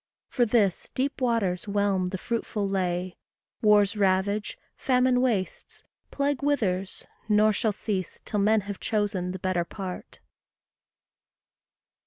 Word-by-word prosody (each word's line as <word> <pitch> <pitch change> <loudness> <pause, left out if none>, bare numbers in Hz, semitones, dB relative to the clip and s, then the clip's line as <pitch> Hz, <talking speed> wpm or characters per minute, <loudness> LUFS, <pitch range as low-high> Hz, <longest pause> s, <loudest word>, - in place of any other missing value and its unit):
For 245 -3 +2
this, 210 -5 +1
deep 275 +1 -2
waters 215 -7 0
whelm 200 -2 +1
the 190 - -3
fruitful 215 -1 -2
lea, 180 -2 -2 0.4
Wars 210 -1 +4
ravage, 200 +1 +1 0.2
famine 250 -1 +2
wastes, 220 -7 -2 0.3
plague 280 -1 -1
withers, 195 -10 -1 0.2
nor 215 +1 +4
Shall 220 +1 0
cease 195 -3 -4
till 210 - -3
men 215 +2 +3
have 200 0 -7
chosen 200 -4 -1
the 185 - -5
better 185 -1 0
part. 185 +1 -8
205 Hz, 120 wpm, -26 LUFS, 185-230 Hz, 0.4 s, Wars